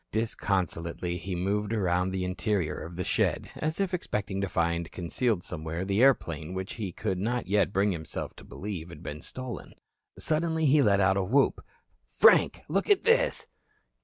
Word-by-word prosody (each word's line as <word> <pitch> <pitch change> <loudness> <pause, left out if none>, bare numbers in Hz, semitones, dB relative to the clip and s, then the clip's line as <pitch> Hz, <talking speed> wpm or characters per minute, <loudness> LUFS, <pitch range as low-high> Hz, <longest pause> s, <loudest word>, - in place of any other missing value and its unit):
Disconsolately 90 -6 -1
he 90 +2 -4
moved 100 +4 -1
around 90 -3 +1
the 95 -1 -2
interior 90 -3 0
of 85 +1 -7
the 90 - -2
shed, - - 0
as 155 +3 -2
if 195 -2 0
expecting 100 - -2
to 100 - -1
find 85 -1 0
concealed 95 +3 -1
somewhere 80 +1 -4
the 100 +3 +1
airplane 85 - +2
which 95 +1 -4
he 105 -5 -4
could 95 0 -2
not 120 +5 -1
yet 100 0 +2
bring 100 +1 +2
himself 80 -4 -5
to - - -12
believe 90 -5 -6
had 85 0 -11
been 75 -2 -6
stolen. 130 -1 -7 0.4
Suddenly 160 0 +1
he 145 +1 +5
let 100 -5 +4
out 95 +1 +3
a 100 - +1
whoop. 130 +9 +2 0.4
"Frank, - - +5
look - - 0
at 405 -2 +4
this." - - +3
95 Hz, 170 wpm, -28 LUFS, 90-115 Hz, 0.4 s, he